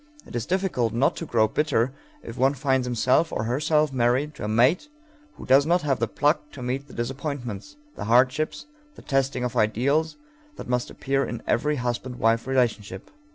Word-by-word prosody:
It - - -11
is 120 - -3
difficult 175 - 0
not 130 +5 +2
to 165 - -5
grow 110 -4 +3
bitter 130 -1 0 0.3
if 115 - -8
one 135 +2 +2
finds 130 -2 0
himself 125 +7 +2
or - - -2
herself 150 +4 +1
married 130 +4 +1
to 140 - -9
a - - -2
mate 120 - +3 0.5
who - - -10
does 135 +2 +5
not 175 0 +2
have 135 -5 0
the 115 - 0
pluck 150 +5 0
to 130 - -8
meet 130 +3 -3
the - - -14
disappointments, 130 -1 -5 0.2
the 100 - -6
hardships, 130 - +2 0.3
the - - -14
testing 135 -2 0
of 125 -2 -3
ideals, 140 - +1 0.4
that - - -9
must 125 0 -1
appear 135 0 -1
in 120 - -5
every 150 +6 +1
husband 125 0 -3
wife 115 0 +1
relationship. 115 -7 -1
130 Hz, 185 wpm, -25 LUFS, 120-145 Hz, 0.5 s, does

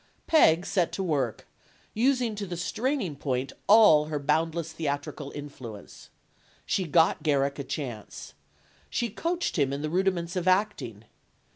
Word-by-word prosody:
Peg 175 - +5
set 180 -4 0
to 195 - -2
work, 140 - -1 0.5
using 250 0 +1
to 205 -1 -5
the 175 -1 -5
straining 215 - -2
point 135 -2 -2
all 205 -9 +7
her 155 -1 -3
boundless 160 +3 0
theatrical 145 -2 -4
influence. 130 -8 -9 0.6
She 190 - 0
got 165 +1 +3
Garrick 140 -2 +1
a - - -2
chance. 125 -6 -6 0.6
She 235 - -1
coached 335 - -2
him 140 -2 +2
in 140 +1 -3
the 155 - -2
rudiments 180 -1 0
of 180 0 -2
acting. 185 - 0
165 Hz, 140 wpm, -27 LUFS, 140-195 Hz, 0.6 s, all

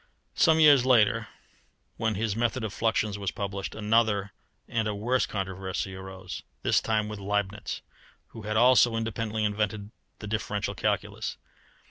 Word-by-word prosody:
Some 160 -3 +4
years 145 -5 +7
later, 115 -3 +4 0.7
when 115 -1 0
his 105 0 -1
method 120 +1 0
of 110 -2 -3
fluxions 110 -2 0
was 100 -2 -1
published, 100 0 -4
another 105 -2 +2 0.4
and 110 -2 -1
a 105 - -2
worse 120 +5 +1
controversy 95 -1 -3
arose 95 0 -8 0.2
this - - +3
time 110 -1 0
with 105 -1 -6
Leibnitz, 105 0 -2 0.5
who 115 - -10
had 110 +1 -2
also 120 -1 +6
independently 110 -1 -2
invented 105 0 -2 0.3
the - - -8
differential 105 -1 -2
calculus. - - -2
105 Hz, 140 wpm, -28 LUFS, 100-115 Hz, 0.7 s, years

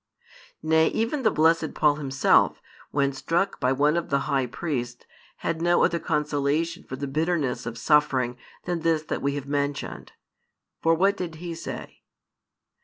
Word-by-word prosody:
Nay, 160 0 +4
even 230 +6 -1
the 220 - +4
blessed 160 -2 +2
Paul 150 -1 +3
himself, 135 -3 +3 0.3
when 140 -1 +1
struck 170 +8 -1
by 130 -1 +2
one 145 +4 +2
of 170 -1 -2
the 140 0 +1
high 135 -3 0
priests, 120 -2 -4 0.3
had 165 0 -3
no 175 +1 +3
other 170 - +2
consolation 150 +2 -1
for 130 - -7
the 140 +2 -4
bitterness 150 -3 -1
of 120 0 -5
suffering 130 -2 +2 0.3
than 175 -1 -1
this 160 -1 +1
that - - -4
we 140 +1 0
have 140 -2 -4
mentioned. 145 0 -3 0.7
For 165 0 +4
what 195 +4 +3
did 175 -4 -5
he 170 +1 -6
say? 165 - -8
150 Hz, 160 wpm, -25 LUFS, 140-165 Hz, 0.7 s, Nay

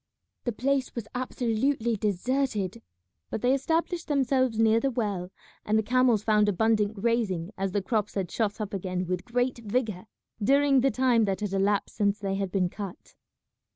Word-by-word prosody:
The 240 - +1
place 265 +3 -1
was 230 -3 -5
absolutely 245 -1 0
deserted, 215 0 -1 0.5
but 220 - -4
they 250 +2 +4
established 330 +5 -1
themselves 260 -5 +1
near 225 0 +4
the 275 - 0
well, 205 -7 -2 0.3
and 215 +1 +1
the 220 - +2
camels 245 -2 +3
found 210 -1 +3
abundant 215 +1 +1
grazing, 205 -5 0
as 195 0 -2
the 200 0 -1
crops 210 +1 -1
had 190 -4 -2
shot 215 -2 -1
up 210 -2 -4
again 185 -1 -2
with 180 0 -2
great 245 +1 0
vigour 220 -3 -2 0.4
during 275 +2 +4
the 270 - +3
time 250 -4 +3
that 195 0 -2
had 205 -2 -2
elapsed 195 +1 +1
since 200 -1 +2
they 195 -2 -3
had 195 -1 -2
been 185 -2 +1
cut. 195 0 -8
220 Hz, 170 wpm, -27 LUFS, 200-250 Hz, 0.5 s, they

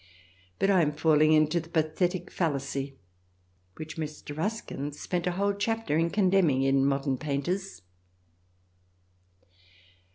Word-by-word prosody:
But 195 - +2
I 185 -3 +5
am 150 -2 +1
falling 155 0 +4
into 155 +2 +4
the 165 0 -10
pathetic 175 +3 -1
fallacy 140 -4 -2 0.8
which 155 0 -8
Mr. 150 -2 -6
Ruskin 160 -6 -3
spent 175 +4 -3
a 180 - 0
whole 200 +2 +1
chapter 225 -3 -1
in 165 +1 +2
condemn 190 -3 +3
ing 135 -1 +1
in 135 0 +3
" - - +3
Modern 135 -1 0
Painters." 155 - -3
155 Hz, 130 wpm, -28 LUFS, 145-185 Hz, 0.8 s, I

